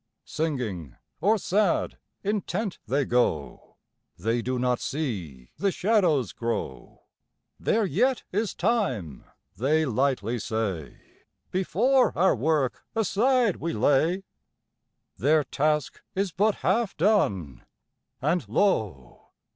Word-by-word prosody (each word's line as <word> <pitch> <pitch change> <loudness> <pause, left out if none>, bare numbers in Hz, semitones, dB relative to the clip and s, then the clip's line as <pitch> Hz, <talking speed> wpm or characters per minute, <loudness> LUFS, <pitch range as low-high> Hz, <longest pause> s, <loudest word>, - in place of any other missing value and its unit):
Singing 110 - -3 0.2
or 205 +8 +3
sad, 200 -1 0 0.2
intent 205 0 -2
they 140 +1 +1
go; 120 -13 -1 0.4
They 115 +6 0
do 130 +2 -2
not 125 0 +1
see 90 - -4
the 200 -1 +1
shadows 180 - +2
grow; 115 - -4 0.6
"There 220 -1 +1
yet 235 - +1
is 210 +1 -1
time," 170 - -1 0.3
they 155 +8 +2
lightly 125 -3 0
say, 100 -9 -3 0.5
"Before 245 +8 +2
our 190 0 +4
work 140 0 0
aside 225 +1 +2
we 165 - -3
lay"; 150 - +2 0.9
Their 150 +4 +3
task 150 +1 -1
is 195 -1 0
but 205 +4 +2
half 200 +3 +1
done, 100 - +1 0.6
and 170 +5 0
lo! 105 - 0
155 Hz, 105 wpm, -26 LUFS, -, 0.9 s, our